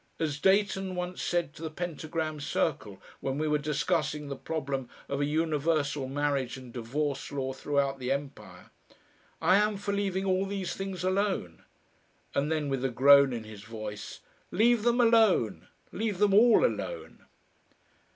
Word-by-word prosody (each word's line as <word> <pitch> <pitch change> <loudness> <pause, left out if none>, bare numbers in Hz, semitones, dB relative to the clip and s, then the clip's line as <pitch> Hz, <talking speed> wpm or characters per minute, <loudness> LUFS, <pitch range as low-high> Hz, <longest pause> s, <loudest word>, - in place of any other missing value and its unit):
As 150 -3 -1
Dayton 190 0 +2
once 180 0 -4
said 170 -4 -1
to 165 - -13
the 160 - -3
Pentagram 155 -1 -4
Circle, 145 -8 -2 0.2
when 135 0 -3
we 155 +1 0
were 150 0 +2
discussing 150 0 -1
the 140 - -3
problem 135 -4 -4 0.2
of 140 0 -2
a - - +2
universal 150 -2 0
marriage 135 -2 -1
and 125 -2 -11
divorce 135 +5 -3
law 135 -2 -2
throughout 140 0 -1
the 125 0 -2
Empire, 135 -10 -6 0.7
"I 185 +4 +5
am 210 0 +2
for 200 0 -3
leaving 195 -1 -1
all 190 0 +1
these 195 -2 -3
things 195 -2 -5
alone." 185 - -1 0.7
And 145 +3 0
then, 155 -2 0
with 135 -2 -2
a 135 - +1
groan 140 +2 +6
in 115 -2 -4
his 110 -2 -10
voice, 110 -2 -7 0.3
"Leave 235 +2 +3
them 240 +2 +2
alone! 220 - +3 0.2
Leave 210 -2 -2
them 205 0 +3
all 230 - +6
alone!" - - -4
150 Hz, 155 wpm, -29 LUFS, 135-190 Hz, 0.7 s, groan